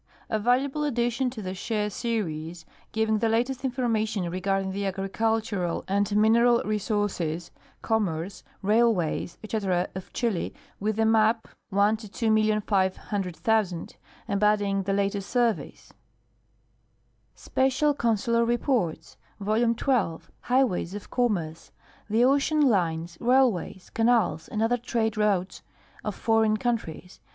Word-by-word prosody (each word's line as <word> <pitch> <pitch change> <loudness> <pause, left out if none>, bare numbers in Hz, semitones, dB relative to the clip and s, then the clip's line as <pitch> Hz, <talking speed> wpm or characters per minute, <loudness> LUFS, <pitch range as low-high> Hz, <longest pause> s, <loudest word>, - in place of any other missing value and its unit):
A 220 - +1
valuable 265 +6 +1
addition 245 -2 0
to 235 -4 -8
the 185 0 -4
Chaix 210 +2 -2
series, 165 -8 -3 0.3
giving 220 -1 +1
the 225 - +1
latest 245 +4 0
information 225 -7 -1
regarding 195 +1 -1
the 200 +1 -2
agricultural 195 -1 -1
and 200 +1 +1
mineral 235 +3 +5
resources, 205 -6 -2 0.3
commerce, 190 -5 -1 0.2
railways,, 210 -6 +1
etc., 195 -5 -1
of 190 -1 -8
Chili, 225 -8 -2 0.2
with 215 +1 -1
a 225 - +4
map, 220 0 +3 0.2
1:2,500,000, 210 -2 0 0.3
embodying 200 -1 +2
the 195 +1 -2
latest 200 0 -1
surveys. 230 - -1 1.4
Special 270 +3 +1
Consular 235 -2 +1
Reports, 235 - -1 0.2
Vol. 220 +3 +1
12 200 -11 -1
— - - -39
Highways 240 -8 +1
of 205 - -9
Commerce. 180 -11 -1 0.4
The 225 +3 +4
ocean 285 +3 +3
lines, 170 - +1
railways, 240 -7 +1
canals, 225 -9 +2
and 215 0 -2
other 240 +2 +2
trade 230 -2 -1
routes 200 -3 0 0.4
of - - -3
foreign 220 -2 +2
countries. 210 -7 -3
215 Hz, 110 wpm, -26 LUFS, 190-235 Hz, 1.4 s, mineral